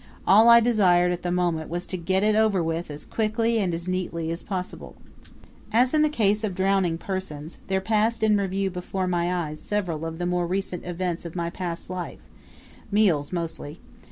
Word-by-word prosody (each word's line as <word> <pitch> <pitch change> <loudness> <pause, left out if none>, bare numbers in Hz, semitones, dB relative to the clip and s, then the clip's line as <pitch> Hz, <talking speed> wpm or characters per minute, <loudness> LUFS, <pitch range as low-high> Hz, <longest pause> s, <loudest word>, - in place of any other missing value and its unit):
All 220 +4 +7
I 235 0 +9
desired 185 -7 +4
at 175 - -3
the 175 - -2
moment 175 -3 0
was 175 +2 -3
to - - -5
get 185 +3 0
it 215 0 +3
over 215 -5 +3
with 165 +1 -2
as 145 0 -8
quickly 225 +1 0
and 190 -4 0
as 170 +1 -4
neatly 170 -3 -2
as 170 - -3
possible. 185 -3 -6 0.8
As 250 +4 +3
in 310 - +4
the 305 - +4
case 215 -6 +1
of 200 -4 -2
drowning 190 -3 +1
persons, 165 -4 -6
there 190 0 0
passed 220 +2 +1
in 215 -1 +4
review 195 -1 0
before 185 +1 -3
my 175 -1 0
eyes 155 -4 -3
several 180 -7 -2
of 165 0 -4
the 175 - -2
more 175 -1 0
recent 185 -1 -3
events 175 -1 -3
of 170 -1 -8
my 170 -1 -2
past 175 -2 -5
life 180 -1 -6 0.7
meals 180 -9 +2
mostly. 165 -2 -4
185 Hz, 190 wpm, -25 LUFS, 170-205 Hz, 0.8 s, I